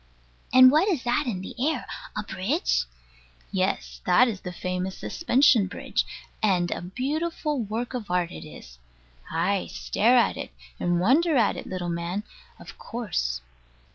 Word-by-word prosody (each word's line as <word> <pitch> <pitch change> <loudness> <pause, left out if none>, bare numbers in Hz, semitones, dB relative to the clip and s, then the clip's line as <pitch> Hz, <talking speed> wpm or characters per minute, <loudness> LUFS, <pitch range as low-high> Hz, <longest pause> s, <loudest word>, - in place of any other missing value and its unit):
And 255 0 +9
what 315 +7 +4
is 335 -11 0
that 245 +4 +1
in 195 -6 -2
the - - -7
air? 305 -3 0 0.3
A 210 - -1
bridge? 200 - 0 0.7
Yes - - -1
that 250 - +6
is 210 -5 -4
the 180 - -5
famous 185 +1 -3
Suspension 260 - +3
Bridge 190 - -2 0.3
and 180 -5 +2
a - - -2
beautiful 295 - -2
work 225 +4 -3
of 235 -6 -5
art 180 -1 0
it - - -8
is. 60 - -12 0.5
Ay, 185 +4 0
stare 240 +4 +2
at 240 - +3
it, - - -5 0.3
and 175 0 +1
wonder 295 - +3
at 225 -4 +3
it, - - -7
little 185 -2 -4
man, 170 +4 -2 0.4
of - - -12
course. 65 - -3
210 Hz, 155 wpm, -26 LUFS, 180-255 Hz, 0.7 s, And